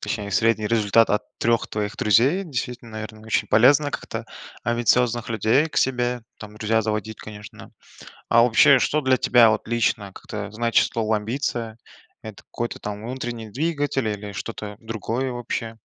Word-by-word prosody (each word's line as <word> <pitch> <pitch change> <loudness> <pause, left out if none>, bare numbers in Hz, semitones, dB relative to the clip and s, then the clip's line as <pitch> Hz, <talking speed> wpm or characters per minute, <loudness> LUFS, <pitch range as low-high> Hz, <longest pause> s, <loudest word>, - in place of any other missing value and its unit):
точнее, 100 -2 -4
средний 110 +1 +2
результат 110 0 +3
от 105 - +1 0.2
3 115 0 +1
твоих 105 0 -3
друзей. 130 - +3
Действительно, 125 -6 -5
наверно, 110 0 -7
очень 105 -1 0
полезно 140 +8 +5
как-то - - -5 0.4
амбициозных 120 0 +1
людей 115 +7 +2
к - - -12
себе 125 -2 0 0.2
там 105 0 -11
друзья 110 +1 +1
заводить, 110 0 -3
конечно. 105 -1 -11 0.6
А 115 - +6
вообще, 125 +3 +6
что 150 +4 +1
для 130 -2 +3
тебя 120 -2 +5
вот 110 0 -1
лично, 110 -4 0
как-то, 105 0 -7
значит 115 +2 +2
слово 110 -1 0
"амбиция"? 115 0 -3 0.5
Это 110 -2 -10
какой-то, 120 0 -5
там, 105 0 -6
внутренний 120 -3 -5
двигатель, 145 -2 -1
или 105 -1 -4
что-то 105 0 -6
другое 115 +3 -3
вообще? 115 -2 -4
115 Hz, 150 wpm, -23 LUFS, 110-125 Hz, 0.6 s, А